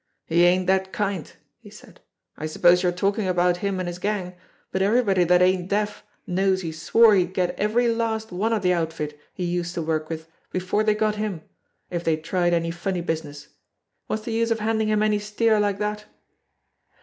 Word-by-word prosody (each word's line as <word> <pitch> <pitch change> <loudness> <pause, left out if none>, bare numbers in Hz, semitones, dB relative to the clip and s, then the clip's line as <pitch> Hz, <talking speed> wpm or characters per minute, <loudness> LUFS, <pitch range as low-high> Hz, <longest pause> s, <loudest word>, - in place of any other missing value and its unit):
"He 170 +2 +3
ain't 180 +1 +3
that 190 0 +1
kind," 200 -6 -3 0.3
he - - -14
said. - - -16 0.4
"I 155 - -4
suppose 175 +3 +4
you're 180 -1 +2
talking 195 +3 0
about 180 -1 +2
him 195 0 -2
and 185 - -3
his 175 0 -5
gang, 195 -2 -2 0.4
but 190 - -1
everybody 200 -3 +3
that 180 +1 +4
ain't 185 0 +1
deaf 210 +1 -1 0.2
knows 190 0 +1
he 165 - -3
swore 215 +8 +4
he'd 185 -1 +1
get 180 -1 +1
every 225 +4 +1
last 225 -2 -1
one 200 +6 -1
of 215 -3 0
the 180 0 +3
outfit 160 -3 -3
he 185 - -6
used 175 0 -2
to 170 - -1
work 155 -1 -2
with 160 0 -6 0.2
before 185 +3 0
they 215 -1 +2
got 215 0 0
him, 205 -7 -3 0.5
if 175 -1 -3
they 160 -2 +1
tried 175 +2 0
any 165 0 -1
funny 175 +1 -3
busi 160 -1 -2
ness. 145 0 -11 0.6
What's 215 0 -3
the 230 - -4
use 230 +1 +1
of 230 - +1
handing 220 0 0
him 215 0 +2
any 210 -1 +2
steer 215 +1 +1
like 205 -1 +1
that?" 210 0 -3
185 Hz, 200 wpm, -24 LUFS, 175-210 Hz, 0.6 s, suppose